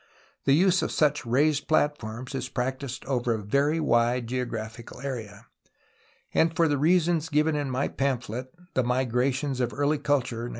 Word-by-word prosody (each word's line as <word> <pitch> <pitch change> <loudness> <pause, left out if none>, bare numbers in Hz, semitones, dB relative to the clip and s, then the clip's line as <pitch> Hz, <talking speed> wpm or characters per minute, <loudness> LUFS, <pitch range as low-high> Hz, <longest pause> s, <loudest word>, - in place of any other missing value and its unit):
The 135 - +5
use 185 +2 +4
of - - -2
such 145 -4 +1
raised 145 +4 +2
plat 150 -1 +2
forms 115 +5 -7
is 130 -1 -3
practised 130 +1 -3
over 125 -3 0
a - - -2
very 140 +10 +1
wide 120 -4 +2
geographical 115 -2 -5
area, 115 -6 -6 0.9
and 165 0 +2
for 170 -2 +4
the 145 -2 0
reasons 165 0 +2
given 155 +1 +2
in 145 -2 -1
my 130 +2 0
pamphlet 130 -2 -2 0.2
The 130 - +2
3Iigrations 130 +2 0
of 120 -1 0
Early 145 +3 0
Culture 125 -5 0
(1915). - - -6
130 Hz, 165 wpm, -27 LUFS, 120-150 Hz, 0.9 s, The